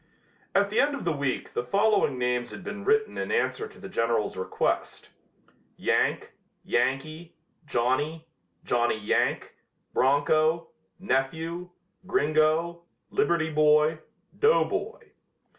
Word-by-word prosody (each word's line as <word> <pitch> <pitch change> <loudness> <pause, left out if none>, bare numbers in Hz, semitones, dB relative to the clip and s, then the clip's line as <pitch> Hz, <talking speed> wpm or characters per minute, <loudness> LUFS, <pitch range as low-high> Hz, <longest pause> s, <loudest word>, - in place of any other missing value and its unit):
At 200 +1 +3
the 215 - +1
end 285 +1 +3
of 280 - -7
the 170 - +2
week 140 -3 -3
the - - -1
following 200 - +2
names 125 -1 -1
had 195 - -9
been 205 +1 -6
written 435 0 +1
in - - -3
answer 440 -1 0
to 435 - -17
the 195 - -8
General's 115 - 0
request: 95 - -2 0.7
"Yank, - - 0 0.3
Yankee, 155 +6 -1 0.3
Johnnie, 145 +6 -1 0.4
Johnny 120 -2 +1
Yank, 105 -1 0 0.4
Broncho, 155 +4 +2 0.3
Nephew, 165 +2 -2 0.4
Gringo, 155 +1 +1 0.3
Liberty 160 -2 +1
Boy, 150 +1 +4 0.4
Doughboy." 450 0 +1
155 Hz, 110 wpm, -27 LUFS, 135-195 Hz, 0.7 s, Boy